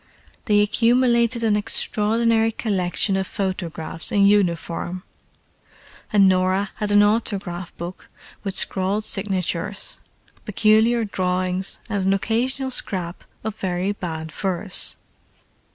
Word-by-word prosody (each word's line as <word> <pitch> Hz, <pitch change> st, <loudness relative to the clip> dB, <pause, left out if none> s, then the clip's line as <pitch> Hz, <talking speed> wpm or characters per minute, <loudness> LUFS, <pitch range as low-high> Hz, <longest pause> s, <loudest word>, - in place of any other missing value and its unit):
They 205 Hz, -2 st, +4 dB
accumulated 235 Hz, +2 st, +2 dB
an 215 Hz, -2 st, +3 dB
extraordinary 225 Hz, +1 st, +1 dB
collection 195 Hz, -3 st, 0 dB
of 190 Hz, -1 st, -1 dB
photographs 175 Hz, -5 st, -4 dB
in 200 Hz, -1 st, +4 dB
uniform; 180 Hz, -2 st, +1 dB, 1.1 s
and 200 Hz, -2 st, +5 dB
Norah 185 Hz, +2 st, +1 dB
had 210 Hz, -2 st, -2 dB
an 205 Hz, 0 st, +6 dB
autograph 195 Hz, -5 st, -1 dB
book 175 Hz, +2 st, -8 dB, 0.3 s
with 195 Hz, -2 st, -4 dB
scrawled 195 Hz, +3 st, +1 dB
signatures, 195 Hz, -2 st, 0 dB, 0.4 s
peculiar 220 Hz, +3 st, +3 dB
drawings 185 Hz, -1 st, -1 dB
and 205 Hz, -4 st, -2 dB
an 195 Hz, +1 st, +3 dB
occasional 255 Hz, +6 st, -1 dB
scrap 180 Hz, -7 st, -3 dB, 0.2 s
of 220 Hz, -1 st, -4 dB
very 185 Hz, +1 st, -1 dB
bad 160 Hz, -5 st, -5 dB
verse. 185 Hz, +2 st, -2 dB
200 Hz, 105 wpm, -22 LUFS, 185-220 Hz, 1.1 s, an